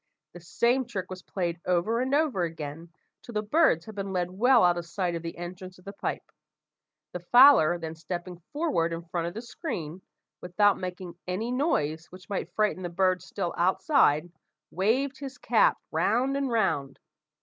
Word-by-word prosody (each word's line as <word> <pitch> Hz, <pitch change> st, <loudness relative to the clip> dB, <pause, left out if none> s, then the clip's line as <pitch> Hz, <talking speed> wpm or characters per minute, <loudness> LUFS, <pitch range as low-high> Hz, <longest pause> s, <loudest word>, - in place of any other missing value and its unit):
The 175 Hz, -, -10 dB
same 240 Hz, +9 st, +1 dB
trick 190 Hz, -6 st, -5 dB
was 185 Hz, 0 st, -7 dB
played 175 Hz, -3 st, -3 dB
over 180 Hz, +7 st, +1 dB
and 265 Hz, +2 st, +1 dB
over 290 Hz, -, +1 dB
again, 165 Hz, 0 st, -5 dB, 0.3 s
till 240 Hz, -, -11 dB
the 210 Hz, 0 st, -1 dB
birds 215 Hz, -, +3 dB
had 220 Hz, -, -9 dB
been 195 Hz, -1 st, -4 dB
led 180 Hz, -1 st, -1 dB
well 240 Hz, +5 st, +4 dB
out 175 Hz, -1 st, +4 dB
of 170 Hz, -1 st, -5 dB
sight 180 Hz, 0 st, -2 dB
of 170 Hz, -, -3 dB
the 165 Hz, 0 st, -7 dB
entrance 180 Hz, +1 st, -8 dB
of 180 Hz, -, -20 dB
the 200 Hz, -, -7 dB
pipe. -, -, -5 dB, 0.8 s
The 180 Hz, -, -5 dB
fowler 205 Hz, -, +6 dB
then 160 Hz, -2 st, -6 dB
stepping 175 Hz, +2 st, -6 dB
forward 285 Hz, -, 0 dB
in 165 Hz, 0 st, -5 dB
front 170 Hz, 0 st, -3 dB
of 175 Hz, -, -7 dB
the 225 Hz, -, -6 dB
screen, 185 Hz, -, -6 dB, 0.4 s
without 200 Hz, +3 st, +2 dB
making 180 Hz, -1 st, -7 dB
any 210 Hz, +7 st, -2 dB
noise 165 Hz, -, 0 dB
which 185 Hz, 0 st, -15 dB
might 200 Hz, -, -4 dB
frighten 210 Hz, -3 st, +1 dB
the 175 Hz, -, -4 dB
birds 185 Hz, 0 st, +1 dB
still 180 Hz, -4 st, -3 dB
outside, 175 Hz, -, +3 dB, 0.4 s
waved 255 Hz, +9 st, 0 dB
his 275 Hz, -1 st, -7 dB
cap -, -, +3 dB
round 260 Hz, +4 st, +1 dB
and 275 Hz, -1 st, -1 dB
round. 170 Hz, -, 0 dB
185 Hz, 180 wpm, -27 LUFS, 170-235 Hz, 0.8 s, fowler